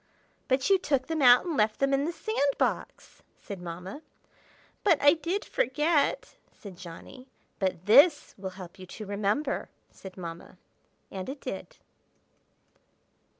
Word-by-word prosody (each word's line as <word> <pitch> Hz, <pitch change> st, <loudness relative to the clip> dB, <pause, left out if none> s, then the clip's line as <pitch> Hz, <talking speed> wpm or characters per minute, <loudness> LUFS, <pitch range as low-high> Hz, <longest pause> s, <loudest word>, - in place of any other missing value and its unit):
"But 265 Hz, 0 st, +1 dB
you 385 Hz, -, +6 dB
took 275 Hz, -6 st, 0 dB
them 320 Hz, 0 st, -2 dB
out 245 Hz, +2 st, +7 dB
and 340 Hz, -3 st, -2 dB
left 215 Hz, -2 st, +2 dB
them 275 Hz, 0 st, +2 dB
in 275 Hz, +1 st, +2 dB
the 335 Hz, -, -1 dB
sand 310 Hz, -7 st, -1 dB
box!" -, -, -3 dB, 0.2 s
said 195 Hz, -3 st, -8 dB
Mamma. 180 Hz, -, -7 dB, 0.8 s
"But 340 Hz, -8 st, +4 dB
I 290 Hz, 0 st, +6 dB
did 340 Hz, +5 st, -3 dB
forget!" 295 Hz, +4 st, 0 dB
said 200 Hz, -3 st, -12 dB
Johnny. 185 Hz, +9 st, -11 dB, 0.3 s
"But 185 Hz, -3 st, -2 dB
this 285 Hz, +8 st, +6 dB
will 190 Hz, -1 st, -6 dB
help 185 Hz, 0 st, -10 dB
you 185 Hz, -, -10 dB
to 215 Hz, -, -8 dB
remember!" 205 Hz, +8 st, -1 dB, 0.2 s
said 190 Hz, -1 st, -12 dB
Mamma. 170 Hz, -2 st, -8 dB, 0.5 s
And 190 Hz, +4 st, -6 dB
it 275 Hz, +1 st, -6 dB
did. -, -, -7 dB
255 Hz, 145 wpm, -28 LUFS, 190-290 Hz, 0.8 s, out